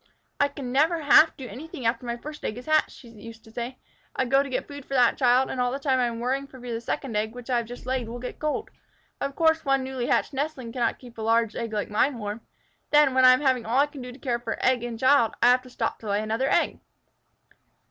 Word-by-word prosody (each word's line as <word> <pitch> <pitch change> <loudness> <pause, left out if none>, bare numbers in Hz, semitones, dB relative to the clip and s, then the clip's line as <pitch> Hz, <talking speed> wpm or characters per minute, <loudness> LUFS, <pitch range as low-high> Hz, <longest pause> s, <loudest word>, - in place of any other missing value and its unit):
"I 285 - +4
can 280 -3 -7
never 315 +5 +2
half 310 +2 +6
do 265 - -7
anything 260 +3 -8
after 230 +1 0
my 235 0 -2
first 300 +4 -9
egg 215 - -3
is 250 - -9
hatched," 310 0 +3
she 245 - -14
used 225 0 -12
to 220 - -16
say. 240 +3 -5 0.4
"I 260 - +1
go 270 +2 +4
to 280 - -4
get 260 - -3
food 285 -1 -9
for 275 - -5
that 245 -2 +4
child, 255 0 +3
and 255 - -2
all 245 0 +1
the 270 - -2
time 270 -2 +1
I 245 - +2
am 230 -1 -5
worrying 265 +3 -1
for 265 -1 -14
fear 245 -1 -6
the 230 - -3
second 250 -1 -4
egg, 220 +2 -1
which 245 +1 -7
I 245 - +3
have 235 -1 -2
just 245 +1 -10
laid, 255 -3 -2
will 240 - -6
get 250 +1 -7
cold. 305 +8 -2 0.5
Of 275 0 -3
course 320 0 +3
one 270 -1 +1
newly 260 -2 -3
hatched - - +1
nestling 270 -4 -3
cannot 240 -1 -1
keep 240 -3 -14
a - - -4
large 230 0 +2
egg 230 -2 -4
like 210 -1 -3
mine 250 +5 +2
warm. 210 +1 -5 0.5
Then, 295 -3 +5
when 260 0 +5
I 255 - +9
am 255 - +1
having 260 -4 +2
all 230 +3 -1
I 280 - +5
can 290 -2 -10
do 250 0 -7
to 245 - -12
care 245 -4 -2
for 230 -1 -3
child 255 -2 +1
and 235 0 -6
egg, 260 -4 +4
I - - +7
have 250 0 +3
to 255 - -14
stop 230 -2 -3
to 215 - -7
lay 205 +1 0
another 225 +5 0
egg." - - +1
250 Hz, 270 wpm, -26 LUFS, 235-275 Hz, 0.5 s, I